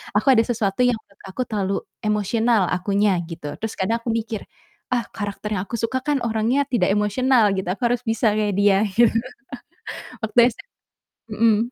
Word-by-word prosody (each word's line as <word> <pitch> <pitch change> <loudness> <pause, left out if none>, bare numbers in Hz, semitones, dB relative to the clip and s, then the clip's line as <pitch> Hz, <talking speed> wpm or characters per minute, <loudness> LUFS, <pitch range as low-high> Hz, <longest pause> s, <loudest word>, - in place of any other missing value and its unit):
aku 220 +6 +4
ada 230 -3 +5
sesuatu 215 -3 -1
yang 245 - +2
menurut 200 - -25
aku 190 +6 -5
terlalu 200 -4 -2 0.2
emosional 215 +1 +1
akunya, 195 +1 +1
gitu. 165 -3 -7
Terus 220 -1 -4
kadang 225 +5 0
aku 230 0 -3
mikir, 225 -2 -3 0.5
"Ah 245 -1 +2
karakter 205 0 -4
yang 185 - -2
aku - - -4
suka 260 +3 -1
kan 290 -2 0
orangnya 230 +4 +1
tidak 195 -8 +1
emosional," 215 +1 +3
gitu, 185 - -3
"aku 230 - -13
harus 245 +1 -1
bisa 225 -1 +2
kayak 210 -2 0
dia." 200 0 +4
gitu. 220 +3 +3 1.1
Waktu 220 +2 -2 0.2
SM - - -15 0.6
mhm. 220 0 +3
215 Hz, 170 wpm, -22 LUFS, 200-235 Hz, 1.1 s, ada